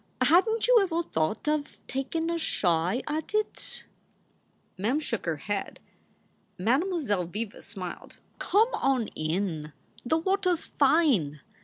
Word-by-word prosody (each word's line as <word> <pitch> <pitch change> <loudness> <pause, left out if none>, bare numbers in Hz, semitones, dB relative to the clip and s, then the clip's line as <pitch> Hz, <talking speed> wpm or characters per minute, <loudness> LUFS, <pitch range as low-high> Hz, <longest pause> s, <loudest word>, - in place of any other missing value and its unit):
Hadn 390 +7 +5
t - - 0
you - - +7
ever 345 -3 0
thought 160 - -2
of 300 -1 -1
takin 320 +6 -2
a 335 - -1
shy 180 - +1
at 310 +6 -3
it? 430 0 -3 0.5
" - - -41
Mem 235 +10 +1
shook 230 - -4
her 165 - +1
head. 200 +6 -4 0.8
Mademoiselle 255 - +1
Viva 205 +5 -5
smiled. 185 -5 -8 0.2
Come 435 +5 +3
on 265 - +1
in; 155 -2 -2 0.3
the 315 +6 +2
water 380 +3 +1
s 330 - -4
fine. 265 - +2
265 Hz, 135 wpm, -28 LUFS, -, 0.8 s, you